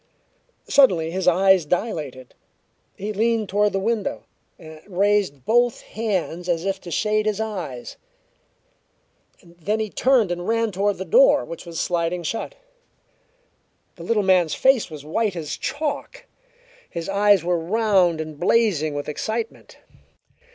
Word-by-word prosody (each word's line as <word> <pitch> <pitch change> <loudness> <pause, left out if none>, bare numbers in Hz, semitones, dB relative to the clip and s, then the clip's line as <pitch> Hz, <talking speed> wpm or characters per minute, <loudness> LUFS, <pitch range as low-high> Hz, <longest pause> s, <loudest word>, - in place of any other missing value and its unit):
Suddenly 180 - +4
his 185 +1 -3
eyes 190 0 +5
dilated; 150 - -3 0.6
he 210 +2 -4
leaned 220 -1 0
toward 205 +1 +2
the 195 - -1
window, 220 +1 -2 0.3
and 155 -1 -12
raised 195 -8 0
both 240 +1 +2
hands 185 -5 -3
as 170 0 0
if 195 0 -2
to 175 - -9
shade 215 +5 0
his 210 -1 -1
eyes. 180 - -5 1.5
Then 175 +5 -4
he 215 -2 -3
turned 245 -8 +2
and 175 0 -4
ran 230 -1 +1
toward 200 +2 0
the 190 - -5
door, - - +5
which - - -9
was 165 -1 -5
sliding 175 0 -1
shut. 225 - -4 1.4
The - - -13
little 215 -3 +1
man's 180 -4 +3
face 265 -6 +3
was 150 -2 -10
white 205 +5 -1
as 155 -3 -4
chalk; 295 0 -4 0.6
his 170 -1 -5
eyes 200 -2 +3
were 175 0 0
round 185 -2 +2
and 155 -2 -6
blazing 175 -7 +2
with 145 - -4
excitement. 220 +9 -5
195 Hz, 135 wpm, -22 LUFS, 170-220 Hz, 1.5 s, eyes